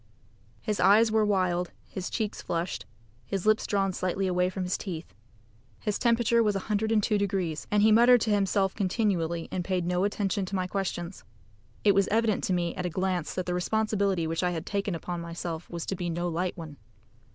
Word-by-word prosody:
His 210 -2 -1
eyes 210 +4 +5
were 220 0 +3
wild, 185 -4 +1 0.2
his 185 -1 -5
cheeks 215 -3 -3
flushed, 170 +1 -3 0.4
his 190 - -3
lips 215 0 +3
drawn 195 -2 +1
slightly 185 +2 -1
away 180 0 +1
from 185 0 -4
his 180 0 -1
teeth. 170 - -6 0.7
His 210 - -2
temperature 235 -1 +3
was 210 -3 +2
102 210 +1 +1
deg., 190 -6 -1
and 210 0 +3
he 220 - +6
muttered 240 +2 +6
to 220 - +1
himself 195 -1 +2
continually, 185 -5 0
and 185 - -2
paid 180 -1 -1
no 180 +1 +1
attention 200 -1 -1
to 195 - -4
my 185 -1 0
questions. 185 -1 -4 0.6
It 205 - +5
was 195 0 +3
evident 220 -1 +1
to - - -1
me 175 -1 0
at 180 - -4
a - - -2
glance 180 -1 -2
that 185 - -2
the 180 - -2
responsibility 200 -1 0
which 165 0 -1
I 180 - +2
had 170 -1 -4
taken 200 -2 -2
upon 175 +1 -4
myself 170 0 -5
was 170 -1 -5
to 195 - -2
be 175 -1 -3
no 175 +1 -2
light 175 +2 -2
one. 155 -4 -8
190 Hz, 195 wpm, -28 LUFS, 175-210 Hz, 0.7 s, he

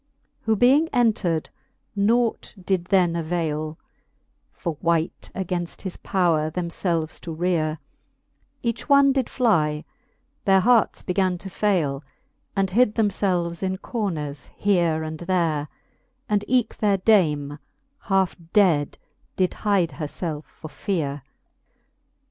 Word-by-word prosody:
Who 220 -1 +3
being 265 +9 +4
entred, 215 - +1 0.4
nought 225 +4 +1
did 185 -1 -1
then 180 -3 +3
availe 160 -2 -2 0.7
For 170 -3 -4
wight, 165 -1 0
againft 180 -2 -3
his 190 -3 -4
powre 165 -5 +1
them 170 +1 -3
ielv^es 165 -2 -2
to 165 -2 -6
reare: 160 -2 0 0.9
Each 235 +3 -3
one 280 -1 +6
did 265 -3 0
flie 155 - +2
j - - -21 0.6
their 195 -1 +5
hearts 235 +2 +3
began 185 -1 0
to 190 +2 -9
faile, 160 -10 0 0.5
And 195 -1 +1
hid 220 +1 +3
them 220 -3 +3
felves 175 -4 -1
in 190 -1 -1
corners 160 - -4
here 170 -6 +2
and 155 0 -5
there; 170 -5 0 0.6
And 205 -1 +1
eke 250 -2 +1
their 205 -2 +2
dame 150 -8 +2 0.5
halfe 195 -3 +2 0.2
dead 170 -9 +3 0.4
did 185 -1 +1
hide 195 -5 +1
her 150 - -5
felf 155 0 -5
for 155 - -12
feare. 145 -5 -2
180 Hz, 125 wpm, -24 LUFS, 160-205 Hz, 0.9 s, one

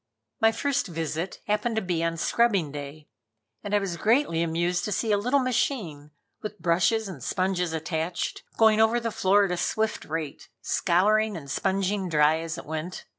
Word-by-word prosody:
My 225 - +5
first 280 +2 -1
visit 165 +1 -4
happened 210 +2 0
to 220 - +1
be 175 -3 -1
on 165 0 -1
scrubbing 195 -4 +2
day, 145 +1 -8 0.6
and 205 0 -1
I - - +6
was 195 -4 -2
greatly 220 - +2
amused 175 +2 0
to 210 - -3
see 220 +2 0
a 205 - +4
little 250 +7 +2
machine, 220 - -1 0.3
with 210 0 -6
brushes 180 +6 +1
and 160 -10 -8
sponges 185 0 0
attached, 160 +2 -3 0.2
going 220 -1 +5
over 225 +2 +3
the 230 -1 -3
floor 200 +1 +3
at 185 - -3
a 180 - -1
swift 220 +5 -1
rate, 155 -2 -5
scouring 205 - +2
and 140 -4 -8
sponging 195 +2 0
dry 155 0 +3
as 165 0 -5
it - - -8
went. 160 +4 -5
180 Hz, 180 wpm, -26 LUFS, 165-215 Hz, 0.6 s, I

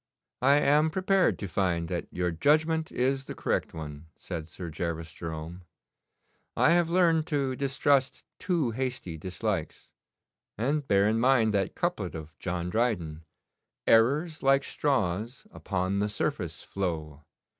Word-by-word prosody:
'I 140 +3 +5
am 150 +2 +4
prepared 190 +2 +2
to 100 - -5
find 90 -3 0
that 90 -1 -3
your 90 -1 -1
judgment 155 - +2
is 135 +2 0
the - - -7
correct - - -1
one,' 75 -1 -8
said 85 -4 -6
Sir 85 0 -7
Gervas 80 0 -4
Jerome. 80 +2 -7 0.9
'I - - +5
have 170 -1 +3
learned 170 -3 +3
to 140 -4 0
distrust 135 0 +1 0.2
too 165 -10 0
hasty 125 -8 -3
dislikes, 95 -1 -4 0.7
and 140 +5 0
bear 100 +1 +4
in 110 +1 +2
mind 120 -3 +4
that 100 -2 0
couplet - - -2
of 80 0 -8
John 90 -1 -3
Dryden 85 -9 -1 0.6
"Errors, 145 +9 +3
like 135 0 +4
straws, 120 - -1
upon 95 0 -2
the 105 +1 0
surface - - -3
flow. 80 -6 -4
110 Hz, 135 wpm, -28 LUFS, 85-140 Hz, 0.9 s, I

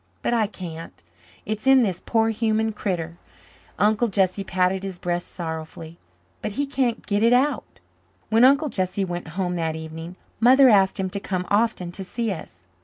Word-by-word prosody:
But - - 0
I 225 -3 +2
can't. 165 - -9 0.4
It's 215 +4 -3
in 265 -2 +7
this 185 -5 -2
poor 225 -1 +2
human 220 0 0
critter," 170 -5 -4 0.6
Uncle 215 +4 +2
Jesse 195 -1 +1
patted 185 0 0
his 195 -2 -6
breast 175 0 -3
sorrowfully, 160 0 -7 0.4
"but 210 - -4
he 285 +6 -1
can't 260 -4 -1
get 205 -1 0
it 230 +2 +5
out." 260 0 0 0.5
When 225 +2 +4
Uncle 280 +4 +5
Jesse 190 -2 -1
went 175 -2 -5
home 180 -2 -1
that 160 -1 -1
evening 160 +2 -8 0.2
Mother 260 +3 +7
asked 195 -2 +4
him 190 -1 -2
to 200 - -3
come 185 -2 -3
often 205 -4 +1
to 190 - -6
see 225 +4 -2
us. 90 - -9
195 Hz, 175 wpm, -23 LUFS, 175-225 Hz, 0.6 s, in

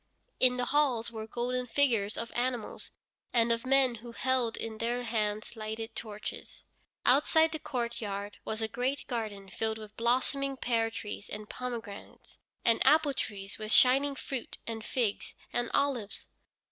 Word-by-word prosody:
In 250 -1 +5
the 250 - 0
halls 255 -5 +2
were 220 -1 -6
golden 250 +2 -2
figures 230 -6 +2
of 230 - -3
animals, 245 -2 -2 0.4
and 235 -1 +4
of 230 +2 0
men 270 -2 +5
who 240 0 -9
held 255 -2 +1
in 220 -1 -4
their 240 +2 0
hands 215 -2 -1
lighted 220 0 -5
torches. 215 -1 -7 0.4
Outside 315 +4 +5
the 315 - -3
courtyard 220 -7 -3
was 220 +1 -2
a - - +2
great 250 +5 -2
garden 215 -5 -4
filled 220 +3 0
with 215 -1 -10
blossoming 265 +3 +1
pear 230 -3 +1
trees 210 -2 -6
and 210 0 -6
pomegranates, 235 -5 -7 0.3
and 230 - +4
apple 295 +1 +5
trees 200 -5 -5
with 215 0 -4
shining 275 +3 +6
fruit, 265 -2 -5
and 225 -1 -4
figs, 230 -4 -1 0.2
and 240 -1 0
olives. 250 -7 0
235 Hz, 150 wpm, -31 LUFS, 220-255 Hz, 0.4 s, shining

